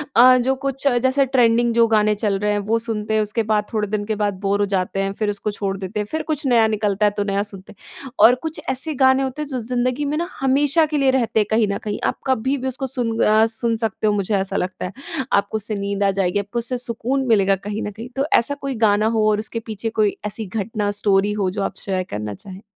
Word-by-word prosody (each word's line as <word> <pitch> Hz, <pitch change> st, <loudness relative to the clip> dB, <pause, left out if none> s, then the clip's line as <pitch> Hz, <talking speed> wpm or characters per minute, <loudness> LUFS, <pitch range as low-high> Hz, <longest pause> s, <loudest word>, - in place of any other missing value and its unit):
अ, 255 Hz, +1 st, +7 dB
जो 260 Hz, +2 st, +1 dB
कुछ 270 Hz, +1 st, -1 dB
जैसे 260 Hz, +2 st, +2 dB
ट्रेंडिंग 235 Hz, 0 st, +3 dB
जो 230 Hz, 0 st, +4 dB
गाने 210 Hz, 0 st, +3 dB
चल 205 Hz, -2 st, 0 dB
रहे 210 Hz, 0 st, 0 dB
हैं 205 Hz, -, 0 dB
वो 230 Hz, 0 st, +3 dB
सुनते 220 Hz, -1 st, -3 dB
हैं 215 Hz, -, +3 dB
उसके 215 Hz, +2 st, -1 dB
बाद 210 Hz, 0 st, +1 dB
थोड़े 210 Hz, -1 st, 0 dB
दिन 205 Hz, 0 st, -2 dB
के -, -, +1 dB
बाद 200 Hz, -2 st, -1 dB
बोर 200 Hz, +1 st, +1 dB
हो -, -, +3 dB
जाते 185 Hz, +1 st, -1 dB
हैं 195 Hz, 0 st, -1 dB
फ़िर 210 Hz, 0 st, -2 dB
उसको 205 Hz, +1 st, -3 dB
छोड़ 195 Hz, -1 st, -2 dB
देते 195 Hz, +3 st, -5 dB
हैं 210 Hz, -, -1 dB
फ़िर 315 Hz, -, -2 dB
कुछ 300 Hz, -1 st, -2 dB
नया 230 Hz, -3 st, +4 dB
निकलता 205 Hz, 0 st, 0 dB
है 205 Hz, -, +3 dB
तो 205 Hz, -, +1 dB
नया 200 Hz, +1 st, +1 dB
सुनते 195 Hz, +1 st, -12 dB
हैं। 265 Hz, -3 st, -12 dB
और 245 Hz, +2 st, +7 dB
कुछ 315 Hz, -, -4 dB
ऐसे 265 Hz, +4 st, -1 dB
गाने 265 Hz, +1 st, +5 dB
होते 265 Hz, +3 st, -4 dB
हैं 300 Hz, -, -4 dB
जो 260 Hz, -3 st, -3 dB
ज़िंदगी 250 Hz, +4 st, -1 dB
में -, -, 0 dB
ना 345 Hz, +2 st, -2 dB
हमेशा 280 Hz, +4 st, +3 dB
के -, -, +2 dB
लिए 270 Hz, -2 st, +3 dB
रहते 230 Hz, -2 st, 0 dB
हैं 210 Hz, -, +2 dB
कहीं 220 Hz, -1 st, +3 dB
न -, -, -2 dB
कहीं। 210 Hz, -1 st, -3 dB
आप -, -, -2 dB
कभी 260 Hz, +2 st, +1 dB
भी 265 Hz, +1 st, -4 dB
उसको 265 Hz, +1 st, -3 dB
सुन 235 Hz, -3 st, -2 dB
अ, 215 Hz, +1 st, +5 dB
सुन 225 Hz, +1 st, -1 dB
सकते 215 Hz, 0 st, -2 dB
हो 210 Hz, -, +3 dB
मुझे 200 Hz, 0 st, 0 dB
ऐसा 195 Hz, 0 st, -3 dB
लगता 185 Hz, 0 st, -2 dB
है। 180 Hz, -, -6 dB, 0.4 s
आपको 200 Hz, +2 st, +1 dB
उससे 215 Hz, +1 st, -3 dB
नींद 200 Hz, 0 st, -2 dB
आ 195 Hz, -, +3 dB
जाएगी 195 Hz, 0 st, 0 dB
आपको 205 Hz, +4 st, -3 dB
उससे 245 Hz, +2 st, 0 dB
सुकून 235 Hz, -2 st, -3 dB, 0.2 s
मिलेगा 200 Hz, -3 st, +3 dB
कहीं 205 Hz, +2 st, -5 dB
न 210 Hz, -, -4 dB
कहीं। 225 Hz, +4 st, -9 dB
तो 275 Hz, -, 0 dB
ऐसा 285 Hz, +5 st, +3 dB
कोई 275 Hz, -2 st, -5 dB
गाना 205 Hz, +1 st, +3 dB
हो 215 Hz, 0 st, +3 dB
और 210 Hz, 0 st, +1 dB
उसके 230 Hz, +1 st, -4 dB
पीछे 220 Hz, +1 st, -4 dB
कोई 205 Hz, -, +2 dB
ऐसी 215 Hz, +1 st, -4 dB
घटना 210 Hz, +1 st, -2 dB
स्टोरी 200 Hz, 0 st, +2 dB
हो 185 Hz, -, +1 dB
जो 200 Hz, -, -4 dB
आप -, -, -3 dB
शेयर 190 Hz, -2 st, -1 dB
करना 105 Hz, 0 st, -4 dB
चाहें? 190 Hz, -, -11 dB
220 Hz, 260 wpm, -21 LUFS, 205-250 Hz, 0.4 s, अ